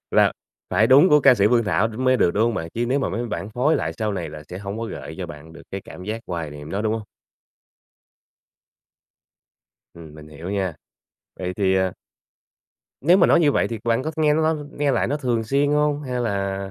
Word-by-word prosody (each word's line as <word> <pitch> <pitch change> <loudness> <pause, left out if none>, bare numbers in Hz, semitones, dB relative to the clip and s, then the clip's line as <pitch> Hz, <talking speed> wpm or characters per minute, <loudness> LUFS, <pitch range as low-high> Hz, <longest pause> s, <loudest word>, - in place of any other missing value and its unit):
là - - +4 0.4
phải 110 - +4
đúng 140 +9 +7
của 150 0 +5
ca 135 -2 +7
sĩ 100 -2 +3
Phương 120 -2 +3
Thảo 105 +2 +1
đ 110 - -9
mới 130 0 +2
được, 85 - +3
đúng 105 - +2
hông 120 -1 0
bạn? 80 -4 -4
Chứ 120 +1 -1
nếu 135 +3 +1
mà 135 - -1
mấy 120 +4 -3
bản 105 -2 -5
phối 130 +8 +2
lại - - -2
sau 110 -2 -1
này 85 -5 -4
là 75 -1 -9
sẽ 90 - -7
hông 100 +2 -6
có 115 - -3
gợi 80 - -7
cho 90 - -4
bạn 80 0 -11
được - - -13
cái 95 - -4
cảm 90 - -11
giác 110 +2 -4
hoài 85 -4 -4
niệm 75 +1 -9
đó, 100 +2 -2
đúng 110 0 0
hông? 110 - -4 2.9
Ừm, 80 -3 -12
mình 75 0 -12
hiểu 80 +4 -8
nha. 95 -4 -2 0.6
Vậy 90 0 -4
thì 95 -2 +2
à 95 -1 +1 1.1
nếu 175 +7 +5
mà 175 - +5
nói - - +5
như 150 -4 +4
vậy - - +1
thì 115 -2 -5
bạn 115 +2 +1
có 155 - -3
th 160 - -23
nghe 150 -1 +4
nó 160 +1 +2 0.2
nghe 145 -1 0
lại 120 - +1
nó 145 +3 -1
thường 120 -5 -1
xuyên 140 +5 +1
hông? 150 0 +1
Hay 125 -3 -3
là, 100 -3 -1
110 Hz, 235 wpm, -22 LUFS, 95-135 Hz, 2.9 s, đúng